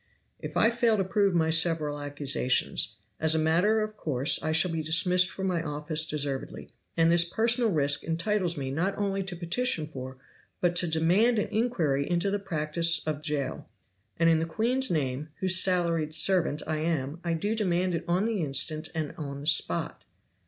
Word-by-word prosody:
"If - - -6
I 225 - +4
fail 235 -2 +1
to 195 - +1
prove 195 0 +1
my 160 -1 +2
several 160 -3 +2
accusations, 145 -3 0 0.2
as 160 0 +2
a - - +2
matter 175 +8 +2
of 215 0 -4
course 145 -5 +1
I 155 - -2
shall 165 +3 +2
be 165 -1 -2
dismissed 180 +4 +2
from 190 - -6
my 180 -3 -1
office 150 0 -2
deservedly; 140 -3 -5 0.3
and 165 0 +4
this 170 0 +5
personal 230 +6 +1
risk 145 -5 +1
entitles 175 +1 -1
me 135 -2 -4
not 185 +8 -2
only 195 -1 -1
to 190 -1 -6
petition 170 +1 -1
for, 130 -3 -9 0.4
but 175 -1 0
to 175 - +2
demand 175 +9 +2
an 210 - -1
inquiry 170 - -1
into 175 +3 0
the 205 - -1
practice 165 -2 0
of 155 -1 -3
Jail. 150 -3 -4 0.5
And 165 - +2
in 165 -1 +4
the 165 - -2
queen's 245 +9 0
name, 145 -2 -2
whose 185 -2 +4
salaried 170 -4 0
servant 170 -5 +2
I 155 - -2
am, 155 -1 -2
I 170 -1 -1
do 205 +7 -2
demand 185 -4 0
it 170 +1 -3
on 180 +4 +1
the 225 -4 -1
instant 155 +2 -1
and 155 -2 -3
on 140 -2 -6
the - - -9
spot." 150 - +1
165 Hz, 185 wpm, -27 LUFS, 150-190 Hz, 0.5 s, this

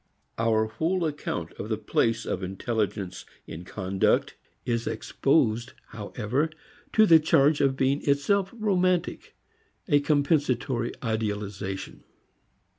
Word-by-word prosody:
Our 110 -1 +2
whole 165 +11 -1
account 145 - -3
of 105 - -5
the 110 - 0
place 115 +1 0
of 90 - -2
intelligence 95 0 -3 0.2
in 80 +2 -8
conduct 95 +1 0 0.3
is 115 -1 -1
exposed 120 -5 +1 0.2
however 115 +7 -2 0.4
to 220 - +6
the 165 -5 +7
charge 150 -1 +3
of 135 -1 +2
being 135 +2 +1
itself 185 +8 +2
romantic, 185 -5 0 0.5
a 145 - +4
compensatory 140 -5 +1
idealization. 105 -3 -3
120 Hz, 110 wpm, -26 LUFS, 105-150 Hz, 0.5 s, the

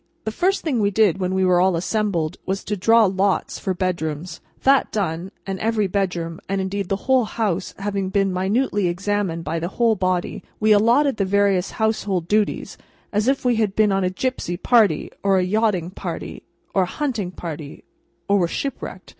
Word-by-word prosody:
The 220 - -1
first 375 - 0
thing 280 -8 0
we 200 -1 +2
did 200 -3 +2
when 185 0 -1
we 190 0 +2
were 180 -1 +4
all 185 -1 +3
assembled, 175 -3 -1
was, 195 +1 -3
to 210 - -2
draw 225 +4 +5
lots 190 0 0
for 190 -2 -2
bedrooms. 170 -2 -3 0.2
That 270 0 +4
done, 180 -3 -2 0.2
and 195 -1 -4
every 220 -1 +1
bedroom, 180 -4 -2
and, 195 0 0
indeed, 195 0 -3
the 195 0 -2
whole 260 -2 +4
house, 200 -5 -2
having 195 -1 -2
been 195 -1 +1
minutely 200 +2 +1
examined 185 -1 -1
by 165 +1 -2
the 170 - -2
whole 225 +3 +2
body, 185 -2 -1 0.2
we 215 0 +3
allotted 235 +6 +4
the 195 - +1
various 195 -1 +2
household 205 -6 0
duties, 210 +2 0 0.3
as 210 +3 +1
if 270 -1 +1
we 245 -2 +3
had 210 -3 0
been 215 -1 +3
on 195 0 +1
a 180 - +1
gipsy 185 -3 -3
party, 210 -6 +3
or 195 -1 +3
a 185 - +2
yachting 190 -3 0
party, 180 -3 -6 0.3
or 195 - +3
a - - +2
hunting 235 -11 -1
party, 160 -5 -8 0.4
or 200 0 +3
were 175 - +2
shipwrecked. 275 +10 -5
195 Hz, 190 wpm, -22 LUFS, 180-215 Hz, 0.4 s, draw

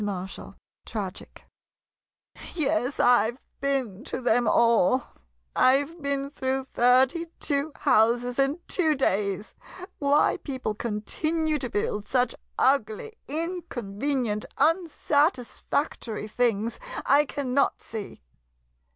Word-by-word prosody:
Marshall 190 -2 -5 0.3
[Tragic] 200 -5 -6 1.1
Yes, 265 -5 0
I 245 -2 +5
've - - -19 0.2
been 260 -7 -1
to - - -4
them 245 -1 +2
all! 235 +1 +4 0.5
I 270 +2 +5
've 330 +3 -13
been 280 0 -2
through 265 -1 -2
thirty 260 +7 +4
two 285 +1 -1
houses 245 0 +2
in 275 +5 +1
two 320 -5 +2
days. 205 -5 -1 0.5
Why 285 +1 +3
people 260 -6 -4
continue 300 +9 -1
to 250 - -3
build 205 -1 -2
such 250 -1 +1 0.2
ugly, 265 - +1
in 335 +5 -3
convenient, 230 0 -2
unsatisfactory 290 - 0
things, 230 -1 0 0.3
I 290 +2 +5
cannot 275 -1 0
see. 210 - -8
255 Hz, 105 wpm, -26 LUFS, 220-285 Hz, 1.1 s, I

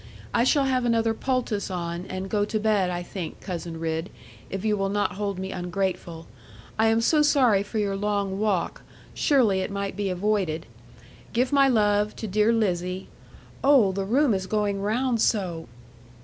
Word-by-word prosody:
I 235 - +3
shall 280 +1 +3
have 260 -2 +1
another 230 -1 +2
poultice 245 -4 -1
on, 175 0 -4
and 185 +1 -5
go 205 +1 +1
to 215 +1 -1
bed, 210 -4 +2
I 175 0 -3
think, 175 -3 -6
Cousin 170 -3 -6
Ridd, 160 +2 -2 0.4
if 195 +2 -4
you 215 -1 +2
will 195 -1 -1
not 205 +1 0
hold 200 0 -3
me 190 +1 -4
ungrateful. 180 -2 -3 0.5
I 220 - +4
am 225 +1 +3
so 300 +6 +3
sorry 260 -9 +4
for 205 +2 -5
your 200 -2 0
long 200 -1 -1
walk. 205 -5 -1 0.3
Surely 240 - +3
it 190 - -2
might 200 0 -3
be 205 -1 -2
avoided. 185 -4 -1 0.7
Give 250 +4 +1
my 275 -1 +5
love 210 -3 +2
to - - -6
dear 210 +3 +3
Lizzie: 185 -4 -1 0.5
oh, 270 -8 +5
the 195 +1 -3
room 255 +4 +3
is 190 -1 -2
going 205 -1 0
round 230 +3 0
so.' 180 - 0
205 Hz, 175 wpm, -25 LUFS, 185-225 Hz, 0.7 s, my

